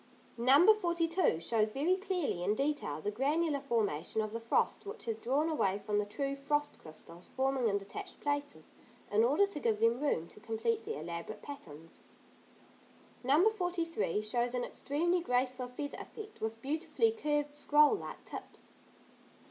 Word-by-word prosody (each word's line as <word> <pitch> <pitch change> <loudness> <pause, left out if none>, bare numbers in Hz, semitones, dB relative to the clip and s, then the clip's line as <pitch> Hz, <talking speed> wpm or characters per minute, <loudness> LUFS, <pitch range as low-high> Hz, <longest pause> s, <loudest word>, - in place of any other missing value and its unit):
No. 280 - +7
42 340 - +1
shows 215 +4 +1
very 320 +7 +2
clearly, 370 - -2
in 205 +4 +1
detail, 275 - -1
the 205 - -2
granular 290 +6 +1
formation 220 - 0
of 215 0 -5
the 230 - -2
frost 230 0 +1
which 420 +3 -8
has 225 -2 -1
drawn 270 +8 0
away 200 -11 +1
from 210 -1 +1
the 205 - -1
true 275 +6 -2
frost 290 +1 -1
crystals 170 +2 -13
forming 265 -2 +2
in 200 -2 +2
detached 200 0 -8
places, 285 0 -3 0.4
in 210 +2 +4
order 290 +12 +4
to 400 -7 -6
give 225 -5 +1
them 230 +3 +3
room 170 - 0
to - - -14
complete 225 +1 -1
their 150 - -4
elaborate 170 +5 -6
patterns. 165 - -10 1.2
No. 295 - +5
43 335 - -1
shows 240 +3 +1
an 245 - 0
extremely 345 +9 0
graceful 255 -3 0
feather 285 +4 -6
effect, 430 -1 -10
with 225 +1 -4
beautifully 320 +10 +1
curved 295 -9 -1
scroll 295 +2 +5
like 420 - -6
tips. - - -10
270 Hz, 155 wpm, -33 LUFS, 220-305 Hz, 1.2 s, No